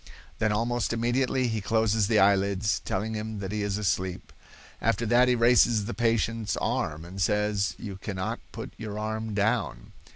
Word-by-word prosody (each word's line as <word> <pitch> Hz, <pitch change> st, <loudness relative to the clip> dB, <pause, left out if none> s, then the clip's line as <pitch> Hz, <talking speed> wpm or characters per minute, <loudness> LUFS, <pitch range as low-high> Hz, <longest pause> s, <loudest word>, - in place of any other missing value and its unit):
Then, 110 Hz, -1 st, +2 dB
almost 115 Hz, +2 st, 0 dB
immediately, 125 Hz, +2 st, +1 dB
he 110 Hz, -2 st, -2 dB
closes 110 Hz, 0 st, +2 dB
the 110 Hz, -, +2 dB
eyelids, 100 Hz, +1 st, +3 dB
telling 110 Hz, +4 st, -2 dB
him 110 Hz, 0 st, -4 dB
that 100 Hz, -1 st, -5 dB
he 105 Hz, 0 st, -2 dB
is 100 Hz, -1 st, -1 dB
asleep. 95 Hz, -3 st, -2 dB, 0.5 s
After 115 Hz, -, +1 dB
that 120 Hz, +3 st, +4 dB
he 125 Hz, -, +3 dB
raises 115 Hz, -2 st, +4 dB
the 120 Hz, -, -4 dB
patient's 115 Hz, -2 st, 0 dB
arm, 80 Hz, +2 st, -2 dB
and 95 Hz, +3 st, -7 dB
says, 105 Hz, +1 st, +1 dB
'You 100 Hz, -4 st, -7 dB
cannot 95 Hz, -2 st, -4 dB
put -, -, -7 dB
your 105 Hz, -1 st, -6 dB
arm 110 Hz, 0 st, -3 dB
down. 110 Hz, +4 st, -1 dB
110 Hz, 165 wpm, -27 LUFS, 100-115 Hz, 0.5 s, that